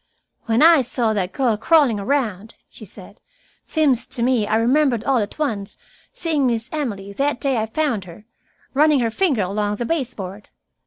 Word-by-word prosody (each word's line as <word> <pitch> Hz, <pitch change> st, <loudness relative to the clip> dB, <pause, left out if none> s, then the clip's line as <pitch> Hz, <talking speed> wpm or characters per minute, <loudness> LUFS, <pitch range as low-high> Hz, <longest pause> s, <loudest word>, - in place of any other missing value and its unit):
"When 230 Hz, +4 st, +3 dB
I 330 Hz, -3 st, +7 dB
saw 240 Hz, -2 st, -1 dB
that 190 Hz, -3 st, -2 dB
girl 250 Hz, -5 st, +1 dB
crawling 270 Hz, -3 st, +3 dB
around," 220 Hz, -3 st, -2 dB, 0.2 s
she -, -, -12 dB
said, -, -, -13 dB, 0.4 s
"seems 275 Hz, -7 st, +1 dB
to 255 Hz, -2 st, -3 dB
me 240 Hz, -4 st, +1 dB
I 215 Hz, -, +1 dB
remembered 245 Hz, +1 st, +2 dB
all 270 Hz, -3 st, +2 dB
at 205 Hz, -1 st, -4 dB
once 220 Hz, -10 st, -3 dB, 0.3 s
seeing 325 Hz, -, 0 dB
Miss 230 Hz, 0 st, -2 dB
Emily, 205 Hz, -10 st, -4 dB
that 275 Hz, +3 st, -1 dB
day 270 Hz, 0 st, 0 dB
I 220 Hz, 0 st, -1 dB
found 235 Hz, -5 st, -1 dB
her, 180 Hz, +4 st, -13 dB, 0.5 s
running 295 Hz, 0 st, +4 dB
her 230 Hz, -1 st, 0 dB
finger 275 Hz, -, +1 dB
along 205 Hz, +2 st, -2 dB
the 240 Hz, -, -4 dB
baseboard. 225 Hz, -, -4 dB
240 Hz, 170 wpm, -21 LUFS, 210-285 Hz, 0.5 s, I